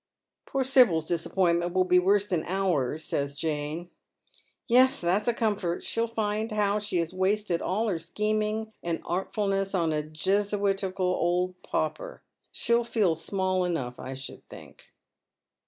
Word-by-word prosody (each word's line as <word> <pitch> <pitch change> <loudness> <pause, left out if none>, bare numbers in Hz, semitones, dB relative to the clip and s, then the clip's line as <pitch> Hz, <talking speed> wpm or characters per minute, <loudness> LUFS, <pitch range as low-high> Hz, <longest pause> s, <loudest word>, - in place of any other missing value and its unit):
" - - -62
Poor 270 -1 0
Sibyl's 245 - +4
disappointment 170 +1 +1
will 185 - +4
be 180 0 +4
worse 200 +2 +3
than 180 -6 -1
ours," 160 -6 0
saya 140 - -1
Jane. 155 +3 -3 0.4
" - - -33
Yes, 255 +2 +5
that's 185 +6 +1
a 240 - +3
comfort. 205 -7 -1
She'll 230 0 -1
find 220 0 -2
how 210 -1 +1
she 205 -3 -2
has 170 0 -1
wasted 190 -1 0
all 215 +5 0
her 180 -6 -1
scheming 215 +5 -1
and 170 -1 -3
artfulness 195 +1 -1
on 165 -3 +1
a 150 - 0
Jesuitical 195 +4 0
old 180 0 0
pauper. 155 0 -3 0.3
She'll 235 0 +1
feel 220 -7 +1
flmall 185 +2 -1
enough, 140 -9 -3
I 130 +1 -6
should 135 0 -8
think." - - -14
185 Hz, 150 wpm, -27 LUFS, 170-210 Hz, 0.4 s, Yes